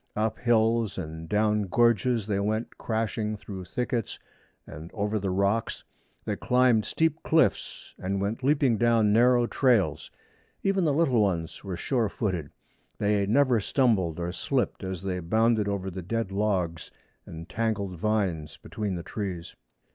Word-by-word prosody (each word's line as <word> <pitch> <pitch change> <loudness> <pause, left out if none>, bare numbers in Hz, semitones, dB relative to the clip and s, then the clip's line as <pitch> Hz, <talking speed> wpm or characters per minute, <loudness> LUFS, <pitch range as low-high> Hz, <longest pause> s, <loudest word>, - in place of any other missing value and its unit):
Up 110 +1 -1
hills 115 -3 +2
and 80 -2 -6
down 105 -1 +1
gorges 115 +2 +2
they 100 -2 -1
went 110 +3 -2
crashing 110 -1 -2
through 95 -2 -8
thickets 120 +1 -3 0.5
and 80 +3 -9
over 105 0 -1
the 95 -1 -2
rocks. 100 +4 0 0.4
They - - -1
climbed 125 -3 +3
steep 160 -1 0
cliffs 160 0 0
and 95 +1 -2
went 100 +5 -2
leaping 135 -5 +2
down 115 -3 +3
narrow 120 +1 +5
trails. 100 - +1 0.5
Even 195 -2 +2
the 150 - +3
little 140 -7 +3
ones 85 -5 -1
were 95 -3 -5
sure 115 +2 0
footed. 90 -9 -3 0.5
They 100 -1 +1
never 125 +1 +3
stumbled 100 - +1
or 85 0 -2
slipped 125 +5 -2
as 95 -1 -5
they 95 -2 -2
bounded 110 +4 +2
over 95 -1 -2
the 95 +1 -6
dead 115 +3 -2
logs 95 -6 -1 0.4
and 80 +1 -9
tangled 105 -4 -2
vines 90 -6 -1
between 105 -3 -4
the 85 - -5
trees. 90 -3 -5
105 Hz, 145 wpm, -27 LUFS, 95-115 Hz, 0.5 s, narrow